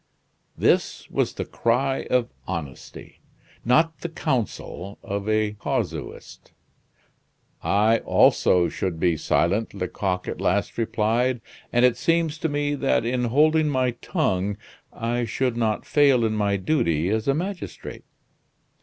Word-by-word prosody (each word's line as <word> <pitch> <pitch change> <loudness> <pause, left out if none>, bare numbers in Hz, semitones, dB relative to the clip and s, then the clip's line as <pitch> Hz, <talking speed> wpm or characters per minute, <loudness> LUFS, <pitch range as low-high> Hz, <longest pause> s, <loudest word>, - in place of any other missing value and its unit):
This - - +1
was - - 0
the - - -4
cry 130 +3 0
of 125 -1 +1 0.2
honesty; 80 -8 -7 0.4
not 160 +7 +2
the 170 - -5
counsel 110 - -3
of 100 +1 -3
a 110 -1 +2
casuist. 105 - -5 1.1
"I 110 +3 +3
also 90 -1 +4
should 90 -4 -3
be 85 -2 +2
silent," 100 +8 0
Lecoq 90 -1 -2
at - - -5
last - - 0
replied; 115 +3 +1 0.3
"and 120 +1 +4
it 125 - +3
seems 165 -2 +1
to 160 - -1
me 145 0 -1
that, 135 -5 +1
in 125 +1 0
holding 155 +5 +3
my 130 -3 +1
tongue, 105 - -1 0.3
I 120 +1 -2
should 125 +2 -1
not 110 -2 -1
fail 140 -5 +4
in 110 - 0
my 100 -2 +1
duty 90 - +1
as 110 +3 -1
a 135 - +3
magistrate." 180 +2 -6
115 Hz, 130 wpm, -24 LUFS, 100-140 Hz, 1.1 s, also